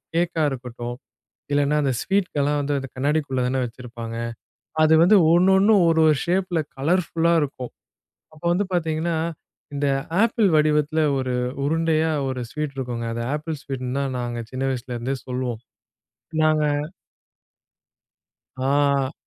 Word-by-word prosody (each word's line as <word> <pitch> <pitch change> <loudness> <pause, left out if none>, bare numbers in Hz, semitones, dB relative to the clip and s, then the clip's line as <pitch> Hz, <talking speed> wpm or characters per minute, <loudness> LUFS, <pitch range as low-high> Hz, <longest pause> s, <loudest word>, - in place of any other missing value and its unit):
கேக்கா 170 -1 +1
இருக்கட்டும். 120 -2 -6 0.6
இல்லனா 145 +1 +2
அந்த 135 - +1
ஸ்வீட்கெல்லாம் 150 -7 0
வந்து 145 0 -1
அந்த 135 - -6
கண்ணாடிக்குள்ள 140 -1 0
தான 130 +1 0
வச்சிருப்பாங்க. 115 -1 -7 0.7
அது 155 0 +5
வந்து 195 +5 +6 0.2
ஒண்ணு 180 +3 +5
ஒண்ணு 205 +3 +5
ஒரு 165 -1 +3
ஒரு 155 - +4
ஷேப்பில 180 -1 0 0.2
கலர்ஃபுல்லா 170 +2 +1
இருக்கும். 130 -3 -5 0.6
அப்ப 155 - -18
வந்து 205 +3 +1
பார்த்தீங்கன்னா, 165 -1 0 0.6
இந்த 140 0 0 0.3
ஆப்பிள் 225 -2 +3
வடிவத்தில 150 +1 +2 0.2
ஒரு 130 -1 -1 0.3
உருண்டையா 160 +1 +1 0.2
ஒரு 130 -1 -3
ஸ்வீட் 150 -2 -4
இருக்குங்க. 120 -3 -3
அது 115 0 -3
ஆப்பிள் 155 0 -5
ஸ்வீட்ன்னு 130 -1 -4
தான் 135 -2 -2
நாங்க 120 -1 -3
சின்ன 130 +1 -3
வயசுல 125 -1 -4
இருந்தே 130 +3 -2
சொல்லுவோம். 125 -3 -3 0.8
நாங்க 155 -1 +3 1.9
அ. 140 +1 +1
145 Hz, 130 wpm, -23 LUFS, 130-160 Hz, 1.9 s, வந்து